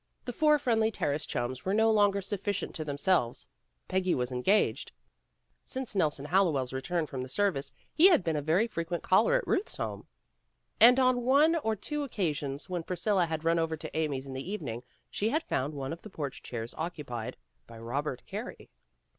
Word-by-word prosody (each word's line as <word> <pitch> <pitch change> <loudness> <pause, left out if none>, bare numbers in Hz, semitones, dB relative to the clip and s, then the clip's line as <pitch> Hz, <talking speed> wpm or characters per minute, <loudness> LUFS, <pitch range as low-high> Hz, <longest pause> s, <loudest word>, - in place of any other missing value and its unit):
The 245 - -4
four 300 +3 +4
Friendly 225 -5 +2
Terrace 145 -8 -2
chums 125 +1 -3
were 190 +2 0
no 220 +1 +4
longer 205 -2 +3
sufficient 200 0 -2
to 160 - -4
themselves. 145 -3 0 0.4
Peggy 185 -1 +1
was 125 0 -2
engaged. 160 +13 +1 0.7
Since 260 -4 -5
Nelson 150 -7 0
Hallowell's 150 -7 +1
return 165 +5 -1
from 135 -3 -5
the 130 - -5
service, 140 -5 0 0.2
he 345 - +7
had 345 - +5
been 165 -2 0
a 150 - 0
very 165 +9 +2
frequent 170 -5 -4
caller - - +4
at - - +1
Ruth's 410 +3 -1
home. - - -5 0.7
And 245 +3 +8
on 255 -1 +3
one 285 +7 +4
or 220 -8 0
two 295 +8 -4
occasions 150 - -2
when 180 -2 -2
Priscilla 180 +2 0
had 160 0 -4
run 165 0 +3
over 160 -1 -1
to - - -8
Amy's 145 -4 -1
in 135 - -7
the 135 +6 -5
evening, 125 - -4 0.3
she 210 - 0
had 315 +6 0
found 145 - -2
one 135 +1 -4
of 170 - -9
the 215 - -10
porch 145 -8 -5
chairs 115 -1 -6
occupied 145 -9 -5 0.3
by 115 - -12
Robert 125 +4 -3
Carey. - - -7
170 Hz, 185 wpm, -30 LUFS, 140-215 Hz, 0.7 s, And